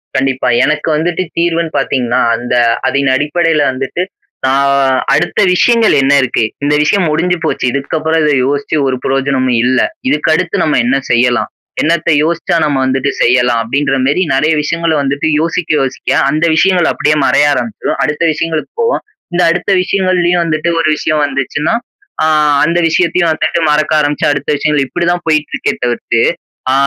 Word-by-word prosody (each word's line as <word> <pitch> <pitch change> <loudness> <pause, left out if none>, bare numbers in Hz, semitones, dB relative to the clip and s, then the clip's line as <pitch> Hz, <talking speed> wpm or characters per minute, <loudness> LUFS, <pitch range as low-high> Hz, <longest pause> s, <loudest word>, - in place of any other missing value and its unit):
கண்டிப்பா. 130 -1 0 0.2
எனக்கு 150 +2 -1
வந்துட்டு 170 +3 -1
தீர்வுனு 170 -1 0
பாத்தீங்கன்னா, 125 -3 0 0.2
அந்த 120 +1 -4 0.4
அதனடிப்படையில 145 +4 +1
வந்துட்டு 135 +7 -3 0.4
நான் 140 +1 +2 0.4
அடுத்த - - 0
விஷயங்கள் 230 +4 +3
என்ன 135 +1 +3
இருக்கு? 130 -3 0 0.2
இந்த 145 +1 +1
விஷயம் 180 +4 +1
முடிஞ்சு 175 +4 0
போச்சு, 155 - -1
இதுக்கப்பறம் 160 +4 -1
இத 150 - +2
யோசிச்சு 140 +3 -1
ஒரு 130 - 0
பிரயோஜனமும் 135 -2 0
இல்ல. 130 +1 +2 0.3
இதுக்கடுத்து 160 +1 0
நம்ம 150 - +1
என்ன 130 +3 +2
செய்யலாம்? 120 0 +1 0.3
என்னத்த 170 +1 +1
யோசிச்சா 165 +2 -1
நம்ம 145 -3 0
வந்துட்டு 135 +1 0
செய்யலாம் 125 -1 +2
அப்பிடின்றமாரி 135 +5 0
நிறைய 145 +4 +1
விஷயங்கள 165 +2 -1
வந்துட்டு 140 +2 -1
யோசிக்க, 165 +1 -2
யோசிக்க 135 -1 -4 0.2
அந்த 155 +3 0
விஷயங்கள் 180 0 +2
அப்பிடியே 150 0 0
மறைய 140 +3 +3
ஆரம்பிச்சிரும். 215 - -3
அடுத்த 150 +2 -1
விஷயங்களுக்கு 160 0 -3
போவோம். 465 +1 0 0.3
இந்த 175 - +1
அடுத்த 175 +3 -2
விஷயங்கள்லயும் 180 -2 +1
வந்துட்டு 160 0 -1
ஒரு 165 - +1
விஷயம் 155 0 -1
வந்துச்சுன்னா, 140 - -2 0.5
அ - - +3 0.4
அந்த 170 +2 +1
விஷயத்தையும் 170 0 +1
வந்துட்டு 155 +2 -1
மறக்க 155 +1 +1
ஆரமிச்சு 145 -1 0
அடுத்த 145 -1 -3
விஷயங்கள், 150 -1 0
இப்பிடித்தான் 175 +3 -2
போயிட்ருக்கே 155 -1 0
தவிர்த்து, 120 -1 -1 0.5
அ - - +2
150 Hz, 145 wpm, -13 LUFS, 135-170 Hz, 0.5 s, விஷயங்கள்